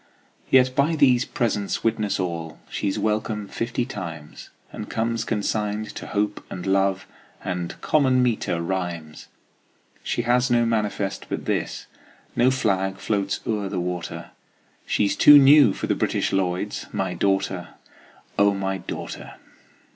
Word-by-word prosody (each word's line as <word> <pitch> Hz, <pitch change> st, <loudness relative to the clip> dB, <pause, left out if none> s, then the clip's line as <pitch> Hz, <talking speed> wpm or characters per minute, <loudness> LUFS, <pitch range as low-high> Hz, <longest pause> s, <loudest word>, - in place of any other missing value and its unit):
Yet 130 Hz, -1 st, +4 dB
by 150 Hz, +4 st, +2 dB
these 130 Hz, -4 st, +4 dB
presents 110 Hz, -7 st, -1 dB
witness 105 Hz, -3 st, 0 dB
all 85 Hz, -3 st, -4 dB
She's 100 Hz, -2 st, -1 dB
welcome 105 Hz, -1 st, -1 dB
fifty 120 Hz, +3 st, -2 dB
times, 85 Hz, -8 st, -8 dB, 0.2 s
And -, -, -7 dB
comes 115 Hz, 0 st, -1 dB
consigned 105 Hz, 0 st, -2 dB
to -, -, -7 dB
Hope 105 Hz, 0 st, -1 dB
and 90 Hz, -, -6 dB
Love 95 Hz, 0 st, +1 dB, 0.4 s
And 90 Hz, -2 st, -4 dB
common 130 Hz, -4 st, +3 dB
meter 110 Hz, -8 st, 0 dB
rhymes. 85 Hz, -4 st, -4 dB, 0.7 s
She 120 Hz, -, -2 dB
has 125 Hz, +2 st, +2 dB
no 120 Hz, -1 st, +3 dB
manifest 105 Hz, -3 st, -1 dB
but -, -, -4 dB
this, -, -, -2 dB, 0.5 s
No 120 Hz, +2 st, +4 dB
flag 95 Hz, -7 st, 0 dB
floats 100 Hz, -1 st, -1 dB
o'er 105 Hz, -3 st, -1 dB
the 95 Hz, -, -2 dB
water, 90 Hz, -1 st, -5 dB, 0.6 s
She's 100 Hz, -1 st, +1 dB
too 145 Hz, 0 st, +9 dB
new 140 Hz, -4 st, +7 dB
for -, -, -4 dB
the -, -, +1 dB
British -, -, -1 dB
Lloyds 95 Hz, +1 st, -1 dB
My 95 Hz, -2 st, -2 dB
daughter, 95 Hz, -3 st, -1 dB, 0.6 s
O 100 Hz, 0 st, +4 dB
my 95 Hz, 0 st, -2 dB
daughter! -, -, -7 dB
105 Hz, 135 wpm, -24 LUFS, 95-115 Hz, 0.7 s, too